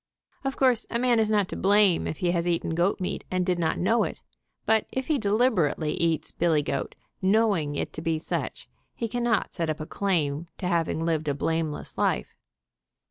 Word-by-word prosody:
Of 270 0 -2
course, 255 -3 +2
a 235 - -1
man 240 -1 +3
is 220 -1 +2
not 205 -3 +2
to - - -5
blame 200 -3 +3
if 155 - -4
he 175 -1 +1
has 170 0 0
eaten 170 -1 0
goat 175 +5 +1
meat 185 - -3
and 185 -1 0
did 180 -1 0
not 160 -2 0
know 225 +6 +2
it, - - -4 0.5
but 220 0 +2
if 260 0 -2
he 300 -1 +1
deliberately 200 - +1
eats 165 -2 0
billy 160 -3 +2
goat, - - -3 0.3
know 210 +2 +3
ing 145 -3 -2
it - - -3
to 155 - -5
be 165 0 0
such, 155 - -4 0.3
he 230 - -2
can 245 +2 -3
not 235 -3 +1
set 165 -3 -2
up 155 - -2
a 155 - -4
claim 165 -5 -1
to - - -5
having 165 -2 0
lived 160 -2 0
a 145 - +1
blameless 160 0 -2
life. - - 0
175 Hz, 205 wpm, -26 LUFS, 160-220 Hz, 0.5 s, man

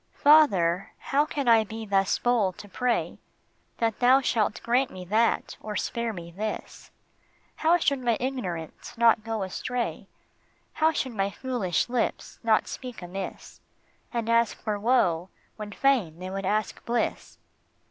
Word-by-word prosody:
FATHER, 195 - +4
how 290 +2 +1
can 280 -4 -3
I 225 -2 +6
thus 205 -3 0
be - - -22
bold 225 -7 +2
to 205 - -10
pray 245 +4 -1 0.6
That 225 -2 0
thou 255 +2 +6
shalt 220 -5 0
grant 250 +3 +2
me 185 -1 -9
that 220 +5 +1
or 210 -1 -5
spare 235 +1 -2
me 170 -4 -8
this? 210 +5 -6 0.7
How 330 +2 +4
should 280 -5 +1
my 240 -3 +1
ignorance 230 - -5
not 230 -2 +4
go 225 -2 -2
astray, 240 +6 -3 0.7
How 315 +1 +3
should 265 -5 -2
my 195 -2 0
foolish 225 -6 -1
lips 245 -1 -2
not 225 -2 +2
speak 250 -7 -7
amiss 190 +2 -7 0.5
And 230 -2 -2
ask 230 -1 +2
for 210 -2 -2
woe 190 -7 +2 0.3
when 210 -1 -7
fain 220 - +1
they 185 +1 -6
would 195 0 -3
ask 215 +2 -1
bliss 235 0 -2
225 Hz, 145 wpm, -27 LUFS, 195-250 Hz, 0.7 s, I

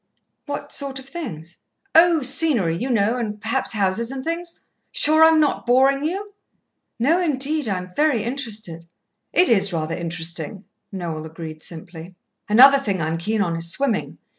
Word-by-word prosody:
"What 285 0 -5
sort 275 -1 -4
of 265 - -7
things?" 175 - -7 0.4
"Oh, 330 -2 +5
scenery, 255 - +2
you 245 +10 -3
know, 225 0 +1
and 210 -3 -4
perhaps 225 +5 -1
houses 210 +2 0
and 265 0 -6
things. 335 +2 -4 0.3
Sure 315 +1 +4
I'm 320 0 +6
not 295 -4 0
boring 270 +3 +3
you?" 395 +6 -4 0.6
"No, 305 +10 +2
indeed, 295 -3 0
I'm 180 -2 -4
very 290 -8 +2
interested." 215 -10 -5 0.4
"It 360 - +4
is 200 -4 +4
rather 160 -1 -2
interesting," 170 +2 -4 0.3
Noel 170 -5 -5
agreed 160 -1 -9
simply. 170 +2 -9 0.3
"Another 270 +6 +7
thing 200 -8 -2
I'm 160 +1 -2
keen 215 +4 0
on 170 -3 -2
is 165 0 0
swimming. 265 -3 0
230 Hz, 155 wpm, -21 LUFS, 175-280 Hz, 0.6 s, Another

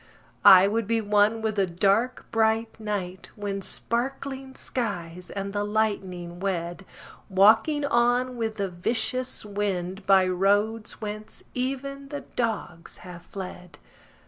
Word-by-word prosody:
I 190 -1 +9
would 220 +1 -1
be 230 0 +2
one 210 +1 +2
with 215 -1 -1
the 195 -1 +3
dark 200 +8 +1
bright 225 0 +1
night 195 -4 -4
When 200 -1 -4
sparkling 265 +5 -3
skies 180 -7 -4
and 195 0 -5
the 205 0 0
lightning 195 -5 -2
wed— 175 -1 -3 0.4
Walking 220 - +4
on 245 0 +2
with 225 -2 -2
the 200 -2 -1
vicious 230 +8 0
wind 195 -2 -3
By 190 -1 +6
roads 205 +5 +1
whence 215 0 -7
even 275 +2 -3
the 285 -1 -5
dogs 215 -8 -4
have 175 -1 -9
fled. 180 -1 -9
210 Hz, 125 wpm, -26 LUFS, 190-230 Hz, 0.4 s, I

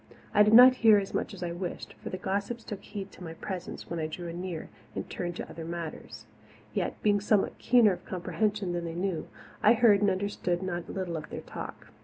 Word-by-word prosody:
I 210 - +6
did 210 +1 +6
not 255 +1 +10
hear 220 -3 +7
as 195 -1 -2
much - - -1
as 195 -3 -7
I 175 - -2
wished, 175 +1 -5
for - - -5
the 185 - -4
gossips 200 +5 -2
took 205 -3 -6
heed 200 -2 -7
to 185 - -12
my 165 -1 -7
presence 180 +1 -6
when 170 - -4
I 155 - -1
drew 170 +2 -6
anear 170 -1 -5 0.3
and - - -4
turned 175 -1 -4
to - - -5
other 165 - -8
matters. 170 -1 -6 0.5
Yet, - - -2
being 205 -1 +3
somewhat 205 -1 +1
keener 235 -5 +5
of - - -8
comprehension 200 +1 -1
than 175 -1 -2
they 165 0 -5
knew, 180 -2 -2 0.3
I 215 - +7
heard 220 -4 +5
and 205 - +4
understood 185 -2 -1
not 175 -2 -4
a - - -4
little 180 -4 -3
of 155 - -7
their - - -6
talk. - - -8
190 Hz, 225 wpm, -29 LUFS, 175-205 Hz, 0.5 s, not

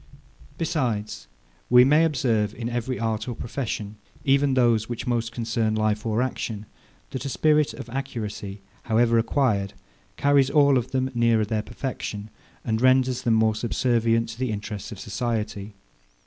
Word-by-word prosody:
Besides, 120 -10 -2 0.4
we 125 0 +8
may 150 +5 +5
observe, 115 -8 0
in 115 0 -4
every 120 +1 -3
art 110 -1 -2
or 120 - -3
profession, 110 -4 -4 0.3
even 140 0 +3
those 115 -3 +3
which 120 0 -4
most 120 -2 -1
concern 115 -2 -1
life 110 0 0
or 110 +3 +1
action, 110 -4 -4 0.5
that 130 - -4
a 140 - -3
spirit 150 +1 +2
of - - -8
accuracy, 110 -6 -5 0.2
however 115 0 +3
acquired, 110 -5 +1 0.4
carries 140 -2 +3
all 140 -2 +5
of 120 - -6
them 130 0 -1
nearer 115 -2 +3
their 110 0 -1
perfection, 105 -4 -5 0.3
and 110 -1 0
renders 130 -1 +3
them 115 -2 +2
more 110 0 +3
subservient 115 0 +1
to - - -9
the 130 -3 -1
interests 105 +1 -5
of 105 - -8
society. 105 -2 -3
115 Hz, 150 wpm, -25 LUFS, 110-130 Hz, 0.5 s, we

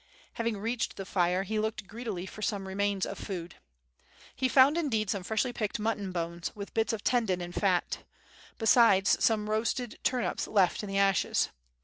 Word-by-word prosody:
Having 230 -2 -2
reached 230 +4 -2
the 195 - -5
fire 180 0 +1
he 215 +2 -2
looked 215 -1 -2
greedily 210 -3 -5
for 215 - -10
some 205 -4 -2
remains 200 0 0
of - - -6
food. 175 -4 -6 0.8
He 260 0 +1
found 270 +4 +6
indeed 225 - 0
some 200 - -2
freshly 220 +6 -1
picked 215 -4 -2
mutton 210 -3 -2
bones 170 -1 -3
with 200 -1 -8
bits 225 0 +1
of 220 -2 -4
tendon 220 -7 +1
and 175 0 -6
fat, 185 -3 +1 0.6
besides 220 -4 +5
some 215 -2 +2
roasted 225 +2 -1
turnips 250 -2 -1
left 195 -4 +2
in 210 - -6
the 195 - -1
ashes. 195 -1 +2
210 Hz, 170 wpm, -30 LUFS, 190-225 Hz, 0.8 s, found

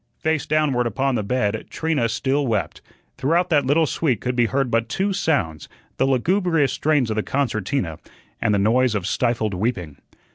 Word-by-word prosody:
Face 160 -1 -1
downward 145 -6 +1
upon 135 +5 0
the 115 - 0
bed, 105 -1 -1
Trina 155 -8 -1
still 135 +5 0
wept. 110 -4 -2 0.4
Throughout 170 +7 +1
that 145 -4 +3
little 160 +4 +3
suite 140 -7 0
could 125 0 -2
be 120 -1 +3
heard 135 -1 -1
but 115 0 +1
two 195 +7 0
sounds, 90 - -1 0.3
the 130 - +2
lugubrious 165 +2 +1
strains 145 -7 +1
of - - -1
the 110 - +1
concertina 110 - -2 0.4
and 115 - +2
the 105 - +3
noise 115 +4 +2
of 100 -4 -2
stifled 115 -1 0
weeping. 90 - -3
125 Hz, 175 wpm, -22 LUFS, 110-145 Hz, 0.4 s, that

